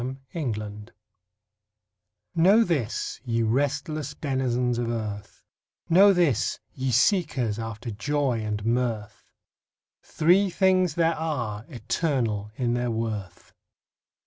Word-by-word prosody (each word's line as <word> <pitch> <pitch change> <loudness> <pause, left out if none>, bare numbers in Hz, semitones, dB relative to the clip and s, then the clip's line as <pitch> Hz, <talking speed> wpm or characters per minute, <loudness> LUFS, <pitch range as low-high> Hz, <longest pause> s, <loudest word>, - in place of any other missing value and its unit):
THREE 130 +2 -4 0.4
THINGS 105 +1 -7 1.4
Know 195 +7 +5
this, 145 - -2
ye 115 -2 0
restless 145 +4 -1
denizens 125 -4 0
of 120 -1 -1
earth, 105 -3 -5 0.5
Know 195 +4 +7
this, 170 - +1
ye 130 0 -2
seekers 125 - +2
after 115 +1 -5
joy 135 +3 0
and 105 -1 -3
mirth, 115 -3 -2 0.7
Three 185 +5 +3
things 185 -3 +2
there 165 -1 +3
are, 120 -10 -3
eternal 115 -4 -1
in 120 -2 0
their 120 0 -1
worth. 110 -5 -4
125 Hz, 105 wpm, -26 LUFS, 110-155 Hz, 1.4 s, Know